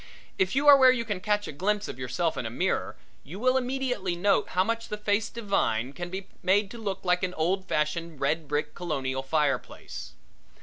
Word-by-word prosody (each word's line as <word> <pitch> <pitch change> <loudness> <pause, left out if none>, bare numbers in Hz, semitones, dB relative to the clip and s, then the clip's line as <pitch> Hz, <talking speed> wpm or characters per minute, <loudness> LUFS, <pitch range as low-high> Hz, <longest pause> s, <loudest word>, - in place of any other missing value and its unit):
If 190 +5 +1
you 285 +2 +2
are 285 - +11
where 260 -1 +7
you 235 -2 -1
can 205 -4 -2
catch 205 +2 0
a - - -4
glimpse 205 +7 -1
of 130 - -7
yourself 160 +7 -1
in 115 - -3
a - - -4
mirror 120 - -1 0.3
you 165 +7 -9
will 255 +2 +3
immediately 250 -7 -1
note 200 +3 +2
how 185 0 +2
much 230 +2 -2
the - - -3
human 210 - -17
face 205 +2 +2
divine 140 - -1
can 175 +2 -6
be 190 +1 -6
made 200 +2 +2
to 235 - -8
look 200 -4 -3
like 180 0 +2
an 180 -1 -2
old 185 +4 0
fashioned 155 0 -1
red 150 +3 0
brick 150 +1 -1
Colonial 135 -6 -2
fire 140 -1 +1
place. - - -10
185 Hz, 215 wpm, -27 LUFS, 155-210 Hz, 0.3 s, are